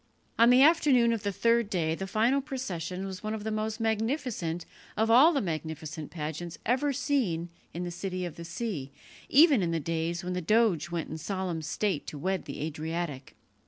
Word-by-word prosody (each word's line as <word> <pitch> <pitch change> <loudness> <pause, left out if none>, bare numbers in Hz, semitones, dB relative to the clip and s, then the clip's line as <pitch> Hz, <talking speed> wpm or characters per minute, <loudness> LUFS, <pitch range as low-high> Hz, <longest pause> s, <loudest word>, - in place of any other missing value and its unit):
On 230 +1 +7
the 250 +2 +7
afternoon 275 -7 +5
of 225 - -2
the 205 -1 -1
third 230 +1 +2
day 165 -6 0
the 190 +4 -4
final 230 +7 +2
procession 195 - -4
was 190 0 -6
one 215 0 -3
of 210 - -6
the 220 - -2
most 215 +1 -2
magnificent 225 - -1 0.3
of 225 +1 +2
all 270 +8 +8
the 285 - +1
magnificent 160 -2 -5
pageants 160 +1 -5
ever 260 +5 +2
seen 240 - 0 0.2
in 175 - -4
the 175 - -4
City 185 +1 -4
of 175 - -6
the 170 - -8
Sea, 170 - -4 0.4
even 290 - +6
in 175 - 0
the 165 -1 0
days 165 +3 -2
when 180 0 -3
the 180 - -2
doge 210 -2 +2
went 170 -2 -4
in 160 - -5
solemn 185 -1 -3
state 185 +1 -2
to 150 - -6
wed 190 +5 -2
the - - -6
Adriatic. 155 -2 -4
190 Hz, 195 wpm, -29 LUFS, 165-230 Hz, 0.4 s, all